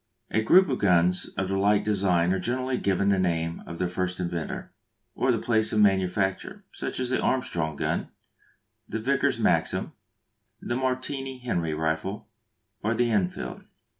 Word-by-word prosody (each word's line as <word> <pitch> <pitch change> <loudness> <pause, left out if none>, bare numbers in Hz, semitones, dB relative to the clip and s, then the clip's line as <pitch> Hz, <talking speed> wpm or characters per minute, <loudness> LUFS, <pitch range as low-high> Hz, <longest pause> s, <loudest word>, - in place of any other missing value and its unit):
A 110 - +2
group 185 - +6
of 130 -4 -1
guns 90 -1 +3
of 95 - 0
the 95 0 0
like 100 +1 +3
design 95 -4 +2
are 95 - 0
generally 130 +1 -1
given 100 0 +1
the 100 -1 +3
name 85 -2 -1
of 85 - -7
their 90 - 0
first 90 0 -2
inventor, 85 -2 -4 0.4
or - - +1
the - - +2
place 110 -2 +1
of 110 - +1
manufacture: 95 -1 +1
such - - -5
as 125 -1 -1
the 130 - +1
Armstrong 85 - -1
gun, - - -2 0.8
the 110 - -2
Vickers 130 +5 +1
Maxim, - - +1 0.7
the 120 - -3
Martini 130 +1 -2
Henry 85 -11 -2
rifle, 80 +6 -2 0.6
or 110 +3 +1
the 120 0 +1
Enfield. 95 -4 -2
100 Hz, 160 wpm, -26 LUFS, 90-120 Hz, 0.8 s, group